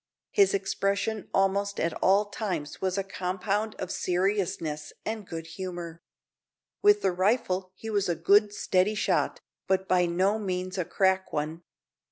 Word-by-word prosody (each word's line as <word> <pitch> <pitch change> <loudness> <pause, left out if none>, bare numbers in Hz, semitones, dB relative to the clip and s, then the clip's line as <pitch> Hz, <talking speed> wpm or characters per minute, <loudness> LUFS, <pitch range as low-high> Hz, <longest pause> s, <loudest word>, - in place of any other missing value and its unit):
His 400 - +4
expression 200 +2 -1
almost 200 +1 +1
at 165 0 0
all 195 +3 +4
times 200 -8 -4
was 185 0 0
a 195 - 0
compound 195 +3 -2
of 185 - -5
seriousness 180 -5 -1
and 215 -3 -4
good 165 -1 -6
humour. 170 -1 -6 0.8
With 415 0 +5
the - - +3
rifle 185 0 +1
he 225 +3 -6
was 200 -3 +1
a 170 - +1
good, 205 +6 +4
steady 205 0 +1
shot, - - 0 0.3
but 190 0 +1
by 180 -1 +3
no 190 +5 +1
means 185 -1 -3
a 180 - 0
"crack" 190 +1 +1
one. 155 +3 -3
190 Hz, 150 wpm, -28 LUFS, 180-205 Hz, 0.8 s, With